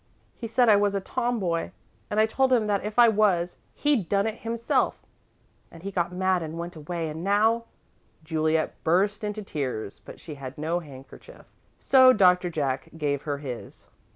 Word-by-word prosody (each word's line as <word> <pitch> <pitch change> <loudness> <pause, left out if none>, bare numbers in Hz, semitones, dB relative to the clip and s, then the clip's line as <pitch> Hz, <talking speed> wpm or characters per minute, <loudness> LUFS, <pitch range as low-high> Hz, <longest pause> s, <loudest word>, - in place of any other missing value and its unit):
He 230 - -6
said 240 +2 +3
I 210 -2 +7
was 205 0 +1
a - - +1
tomboy, 195 -5 -2 0.4
and 210 - 0
I 215 - +6
told 260 +4 +1
him 235 -4 +3
that 205 -2 0
if 210 +2 -5
I 240 -1 +8
was, 200 -5 +2 0.2
he'd 275 - +1
done 200 0 +2
it 220 0 -3
himself, 230 0 -1 0.6
and 165 0 -14
he 200 - -4
got 175 -2 -1
mad 185 0 +1
and 160 0 -6
went 170 +1 -6
away, 165 +2 -4
and 155 +2 -6
now 220 +4 +2 0.3
" - - -37
Juliet 155 0 -1
burst 200 +6 +1
into 210 0 -4
tears, 130 - -4
but - - -12
she 155 - -9
had 130 0 -7
no 160 +3 -1
handkerchief, 135 -5 -13 0.3
so 260 -1 +6
Doctor 180 -4 +4
Jack 140 -5 -2
gave 145 -3 -1
her 145 - -1
his. 130 -4 -8
185 Hz, 180 wpm, -26 LUFS, 160-215 Hz, 0.6 s, I